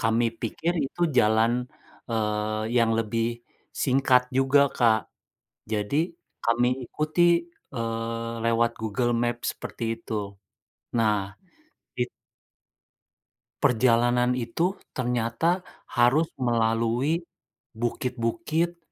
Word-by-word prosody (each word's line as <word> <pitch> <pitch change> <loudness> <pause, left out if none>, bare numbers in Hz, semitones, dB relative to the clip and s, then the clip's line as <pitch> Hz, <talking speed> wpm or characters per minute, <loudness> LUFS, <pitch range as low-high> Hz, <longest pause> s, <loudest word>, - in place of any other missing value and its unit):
Kami 115 +1 +2
pikir 160 +9 -1
itu 140 +5 -3 0.2
jalan, 110 +2 +4 0.6
eee, 110 -1 -1 0.2
yang 115 -1 +3
lebih 115 +2 -1 0.3
singkat 130 -2 +3
juga, 135 +2 +4
Kak. 115 -3 +3 0.7
Jadi 105 +5 -1 0.5
kami 120 +1 +3 0.2
ikuti, 170 +5 +2 0.3
eee, 115 0 -3
lewat 115 0 +3
Google 120 +3 0
Maps 120 0 -1
seperti - - -7 0.2
itu. 105 -3 -4 0.7
Nah 105 -3 +1 0.7
it 125 0 0 1.5
Perjalanan 125 +1 +3
itu 130 - -1 0.2
ternyata 125 +8 0 0.2
harus 130 +7 +3
melalui 120 +5 +1 0.5
bukit-bukit 135 +8 -1
120 Hz, 85 wpm, -26 LUFS, 115-130 Hz, 1.5 s, jalan